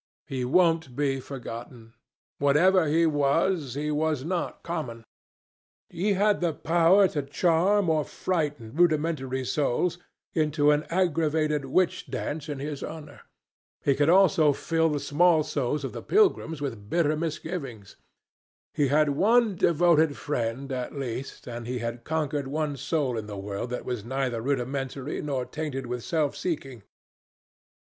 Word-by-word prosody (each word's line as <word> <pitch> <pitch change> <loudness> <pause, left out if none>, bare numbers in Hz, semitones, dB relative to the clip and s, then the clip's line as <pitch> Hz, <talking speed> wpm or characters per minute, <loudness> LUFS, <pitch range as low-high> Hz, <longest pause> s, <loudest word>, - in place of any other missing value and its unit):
He 130 -2 -3
won't 160 -1 +2
be 140 -1 0
forgotten. 120 -3 -8 0.5
Whatever 160 +5 +4
he 165 +3 +3
was, 145 -1 +1
he 150 +1 -2
was 150 -2 0
not 175 +1 -3
common. 145 -9 -4 0.9
He 195 +5 0
had 205 +1 +2
the 170 -2 +1
power 170 +5 +4
to 145 - -2
charm 175 +7 +2
or 155 -2 +2
frighten 145 -11 -3
rudimentary 155 -6 +1
souls 150 +6 0 0.3
into 150 -2 +2
an 150 +1 +1
aggravated 155 -4 +1
witch 175 +7 +1
dance 150 +1 -4
in 145 - -3
his 145 +1 -5
honor; 155 -2 -8 0.6
he 140 - +3
could 145 +3 +2
also 170 -5 +5
fill 165 +3 +1
the 150 -1 -1
small 160 +2 +3
souls 145 -1 -2
of 135 - -4
the - - -6
pilgrims 370 - +2
with 115 -8 -5
bitter 155 0 +2
misgivings: 155 - -5 0.8
he 145 - +2
had 150 +2 +3
one 215 +8 +3
devoted 160 -3 +3
friend 135 -1 -3
at 130 +2 -4
least, 130 0 -5
and 120 -1 -6
he 125 +1 -2
had 115 0 -4
conquered 150 -2 -2
one 150 +1 -2
soul 140 -3 -1
in 105 - -7
the 105 -1 -7
world 100 +4 -4
that 125 - -5
was 125 -5 -3
neither 125 -1 -2
rudimentary 135 +1 -2
nor 135 -4 -2
tainted 145 -4 -4
with 120 -1 -4
self 155 -4 0
seeking. 135 - -4
145 Hz, 145 wpm, -27 LUFS, 130-165 Hz, 0.9 s, also